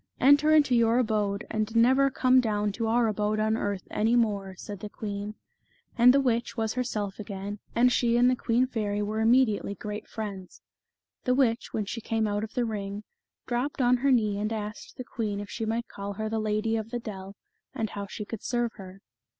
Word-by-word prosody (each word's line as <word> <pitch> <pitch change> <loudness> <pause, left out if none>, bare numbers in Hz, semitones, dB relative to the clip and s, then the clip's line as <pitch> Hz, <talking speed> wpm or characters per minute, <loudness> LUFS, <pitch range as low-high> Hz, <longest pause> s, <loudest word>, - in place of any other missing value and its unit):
" - - -43
Enter 285 +3 +5
into 300 -4 +5
your 230 0 +4
abode, 210 -4 0
and 215 +1 -2
never 260 +4 +5
come 255 -1 +4
down 210 -3 0
to 225 +2 -2
our 235 +1 +3
abode 210 0 0
on 220 +1 +2
earth 200 -4 -3
any 225 +3 +2
more," 200 -5 0
said 205 +1 -8
the 210 - -7
queen. 205 0 -5 0.6
And 245 +1 +7
the 275 - +4
witch 240 -3 0
was 220 -1 0
herself 215 -6 -3
again, 200 0 -6 0.2
and 250 +2 +5
she 235 -1 +2
and 245 +1 +5
the 255 - +3
queen 240 +1 +1
fairy 210 -4 -2
were 215 +1 -2
immediately 225 -3 +3
great 210 +2 -6
friends. 200 -4 -7 0.3
' - - -62
The 250 -1 +3
witch, 245 -3 +1
when 215 - -2
she 230 +4 -5
came 225 0 0
out 205 0 -1
of 220 - -7
the 245 - +1
ring, 205 -2 -4 0.4
dropped 255 +4 -2
on 250 -1 +4
her 275 +2 +2
knee 215 -5 +2
and 215 +1 -2
asked 215 0 -6
the 255 - -5
queen 215 -4 -3
if 205 -1 -7
she 225 - -3
might 230 +2 -1
call 200 0 -6
her 215 +2 -3
the 220 0 -1
Lady 215 +1 0
of 220 0 -4
the 240 - -3
Dell, 200 -4 -8 0.4
and 220 -2 -2
how 200 -1 -5
she 210 +2 -6
could 225 0 -7
serve 240 -2 -1
her. 190 0 -11
220 Hz, 215 wpm, -27 LUFS, 205-240 Hz, 0.6 s, And